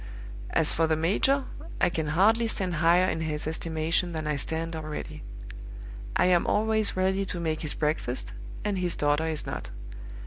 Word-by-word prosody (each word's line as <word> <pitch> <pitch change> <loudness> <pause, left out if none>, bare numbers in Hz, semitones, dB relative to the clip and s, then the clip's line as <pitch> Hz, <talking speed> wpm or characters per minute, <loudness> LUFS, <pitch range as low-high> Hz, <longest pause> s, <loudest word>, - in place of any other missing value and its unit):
"As 160 - +2
for 165 0 +2
the 160 - +2
major, 205 - +2 0.4
I - - +3
can 160 -2 -2
hardly 215 +9 +3
stand 185 -6 0
higher 175 +3 +4
in 160 - -1
his 155 -2 -2
estimation 160 +2 -1
than 155 -1 -3
I 150 0 0
stand 160 +3 -3
already. 155 -1 -6 0.9
I - - +4
am 180 -1 +3
always 220 -1 +1
ready 190 +1 +1
to 180 -2 -4
make 160 -2 -2
his 150 - -2
breakfast, 150 -5 -2 0.3
and 200 -2 0
his 180 -1 0
daughter 145 +2 +1
is 155 -2 -2
not. - - -5
165 Hz, 170 wpm, -27 LUFS, 155-185 Hz, 0.9 s, higher